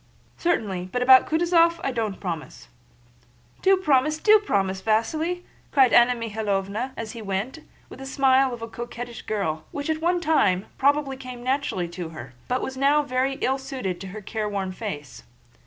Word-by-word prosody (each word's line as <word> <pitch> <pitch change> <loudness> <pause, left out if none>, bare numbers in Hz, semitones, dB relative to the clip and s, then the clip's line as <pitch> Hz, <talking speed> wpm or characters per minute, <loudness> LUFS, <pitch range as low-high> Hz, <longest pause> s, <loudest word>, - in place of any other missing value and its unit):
"Certainly; 200 - -1
but 250 +3 0
about 260 0 +7
Kutúzov, 335 +1 +3
I 270 - 0
don't 220 -5 -3
promise." 160 - -6 0.9
"Do 385 0 +5
promise, 305 -3 +2
do 430 +6 +6
promise, 195 - -1
Vasíli!" 310 - 0 0.3
cried 265 -4 +4
Anna 240 +1 +6
Mikháylovna 215 0 -2
as 225 -1 -5
he 235 - -8
went, 205 +9 -3 0.3
with - - -12
the 270 - -7
smile 265 -1 +3
of 235 -2 -6
a - - -4
coquettish 240 0 -7
girl, 160 -7 -2
which 285 +2 -2
at 315 0 -3
one 350 +2 +2
time 210 - +2
probably 280 -1 +2
came 255 -2 -9
naturally 255 -9 -1
to 175 -1 -6
her, 135 -5 -10
but 250 +1 -1
was 265 - -4
now 285 +3 +3
very 265 0 0
ill 265 +1 +1
suited 255 -10 -4
to 195 - -6
her 210 +3 -8
careworn 205 -2 -3
face. 150 - -7
245 Hz, 170 wpm, -24 LUFS, 200-280 Hz, 0.9 s, about